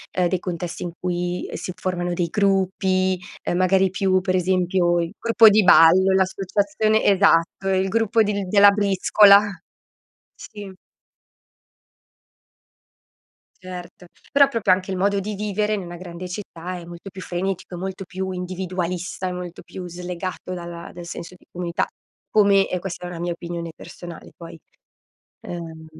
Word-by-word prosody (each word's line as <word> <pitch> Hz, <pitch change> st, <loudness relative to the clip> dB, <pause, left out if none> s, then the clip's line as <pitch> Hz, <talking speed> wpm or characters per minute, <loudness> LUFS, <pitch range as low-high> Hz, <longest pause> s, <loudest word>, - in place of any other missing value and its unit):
ehm, 180 Hz, -1 st, +2 dB
dei 185 Hz, -1 st, 0 dB
contesti 175 Hz, -2 st, -5 dB
in 175 Hz, -, -4 dB
cui 180 Hz, 0 st, -3 dB
si 185 Hz, -, -5 dB
formano 175 Hz, -1 st, -2 dB
dei 175 Hz, 0 st, -1 dB
gruppi, 190 Hz, -1 st, +1 dB, 0.2 s
ehm, 175 Hz, -, -1 dB
magari 190 Hz, +1 st, +3 dB
più 190 Hz, -1 st, +1 dB
per 185 Hz, 0 st, 0 dB
esempio, 180 Hz, -1 st, +1 dB
il 170 Hz, -, -4 dB
gruppo 230 Hz, -1 st, +6 dB
di 210 Hz, +1 st, +4 dB
ballo, 185 Hz, +3 st, +7 dB
l'associazione 200 Hz, +3 st, +1 dB
esatto, 195 Hz, -1 st, +3 dB
il 190 Hz, 0 st, +1 dB
gruppo 225 Hz, +1 st, +2 dB
di 200 Hz, -2 st, -2 dB
della 200 Hz, +1 st, +7 dB
briscola. 200 Hz, 0 st, +5 dB, 0.9 s
Sì. 205 Hz, -3 st, -10 dB, 2.9 s
Certo. 180 Hz, -1 st, -9 dB, 0.2 s
Però 280 Hz, 0 st, +6 dB
proprio 230 Hz, -8 st, +1 dB
anche 185 Hz, +1 st, 0 dB
il -, -, -2 dB
modo 200 Hz, +2 st, +1 dB
di 210 Hz, +2 st, -4 dB
vivere, 210 Hz, +1 st, -1 dB
in 210 Hz, -, 0 dB
una 175 Hz, -1 st, -8 dB
grande 175 Hz, 0 st, -8 dB
città 180 Hz, -2 st, -6 dB
è 170 Hz, -, -10 dB
molto 175 Hz, +3 st, -10 dB
più 190 Hz, 0 st, -10 dB
frenetico, 185 Hz, +1 st, -4 dB
è -, -, -5 dB
molto 190 Hz, +1 st, -5 dB
più 190 Hz, +1 st, -5 dB
individualista, 180 Hz, 0 st, -4 dB
è 180 Hz, -, -2 dB
molto 180 Hz, -1 st, -7 dB
più 185 Hz, -, -9 dB
slegato 180 Hz, +1 st, -6 dB
dalla 170 Hz, -1 st, -8 dB
dal 175 Hz, 0 st, -8 dB
senso 170 Hz, +1 st, -8 dB
di -, -, -25 dB
comunità. 175 Hz, -1 st, -2 dB, 0.5 s
Come, 200 Hz, -2 st, +4 dB
e 180 Hz, -, -2 dB
questa 180 Hz, -1 st, -6 dB
è -, -, -5 dB
una 175 Hz, -1 st, -7 dB
mia 175 Hz, +1 st, -2 dB
opinione 170 Hz, -1 st, -6 dB
personale 175 Hz, -1 st, -11 dB
poi, 165 Hz, -1 st, -10 dB, 0.9 s
ehm 165 Hz, -2 st, -8 dB
185 Hz, 150 wpm, -22 LUFS, 175-195 Hz, 2.9 s, ballo